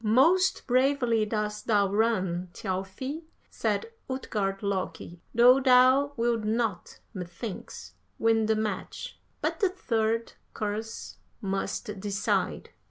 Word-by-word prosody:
"'Most 325 - +4
bravely 250 -4 +2
dost 210 -1 -3
thou 205 -3 +4
run, 190 -4 0
Thjalfi,' 195 - -4 0.3
said 460 - -1 0.2
Utgard 205 -6 -2
Loki, 185 -3 -3
'though 250 +3 +7
thou 260 +2 +5
wilt 230 -1 +1
not, 220 -2 -1 0.2
methinks, 175 - -7 0.2
win 225 -1 +3
the 220 - +3
match. 215 -3 -4 0.2
But - - -1
the 395 -4 +3
third, 230 - -1 0.2
course 215 +2 -4 0.2
must 195 0 -3
decide.' 200 0 -1
220 Hz, 105 wpm, -28 LUFS, 200-250 Hz, 0.3 s, though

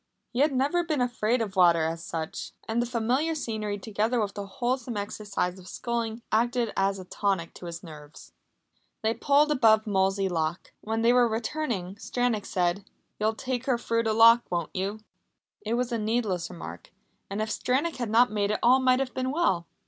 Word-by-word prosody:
He 240 - -2
had 295 +2 +4
never 280 +7 +1
been 310 -4 -1
afraid 240 -1 +1
of 200 -3 -6
water, 170 -3 +5
as 165 +1 -3
such. 160 -1 -5
And 225 +2 +1
the 240 - -1
familiar 250 +7 0
scenery, 215 -7 -3
together 220 +4 -1
with 205 -2 -1
the 200 -1 -6
wholesome 245 +2 -2
exercise 200 -3 -3
of 185 - -14
sculling, 230 +1 -3
acted 235 0 +1
as 195 0 +1
a 185 - -8
tonic 190 -3 -1
to 175 - -9
his 170 +1 -7
nerves. 150 -3 -12 0.7
They 220 +1 +2
pulled 290 +4 +3
above 220 -5 +4
Molesey 195 -1 +1
lock. 165 -1 -2
When 225 +1 -2
they 235 +1 +5
were 245 -1 +5
returning, 220 - -3
Stranack 245 -2 -1
said: 180 +2 0 0.4
"You'll 215 +1 +1
take 255 +1 -3
her 255 -3 +3
through 230 -1 -1
the 220 - +2
lock, 230 +2 +7
won't 170 -3 -3
you?" 200 +3 -2 0.6
It 220 +2 -1
was 245 0 -1
a 230 - -1
needless 215 -5 -1
remark, 175 -2 -9 0.4
and 200 +1 -4
if 215 0 -1
Stranack 275 +10 0
had 240 -3 -3
not 230 +1 +4
made 205 -1 0
it 210 - 0
all 255 +2 +6
might 255 0 +3
have 270 -1 -2
been 260 0 -1
well. 260 - +1
220 Hz, 190 wpm, -27 LUFS, 195-245 Hz, 0.7 s, lock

